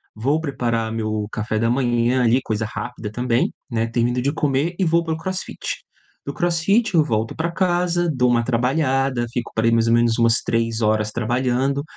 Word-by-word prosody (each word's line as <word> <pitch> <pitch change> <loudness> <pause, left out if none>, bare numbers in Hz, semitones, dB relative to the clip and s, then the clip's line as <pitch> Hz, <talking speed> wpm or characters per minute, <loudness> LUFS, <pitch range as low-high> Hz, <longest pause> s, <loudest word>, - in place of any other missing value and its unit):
vou 140 +8 +1
preparar 120 -7 -2
meu 110 -2 -2
café 110 0 -2
da 115 - +1
manhã, 120 0 +1
ali, 120 +2 +4
coisa 110 -2 -2
rápida 110 -1 -6
também, 120 +1 0 0.2
né, 115 -1 -1
termino 120 +2 0
de 140 +2 +1
comer 150 +2 0
e 190 - +2
vou 170 +1 +2
para 160 - -2
o - - -3
CrossFit. 185 +3 -5 0.4
Do 140 - -4
CrossFit 175 +7 +1
eu 155 - +5
volto 115 -5 -2
para 170 +2 -2
casa, 175 -1 +1
dou 125 -2 +2
uma 120 -1 +2
trabalhada, 130 0 +1
fico 120 -1 -4
por 110 +1 +1
ai, 115 - +4
mais 115 0 +2
ou 115 - +3
menos 120 -1 +3
umas 115 -1 +3
3 115 0 -1
horas 110 0 +1
trabalhando, 130 +5 0
125 Hz, 190 wpm, -21 LUFS, 115-150 Hz, 0.4 s, eu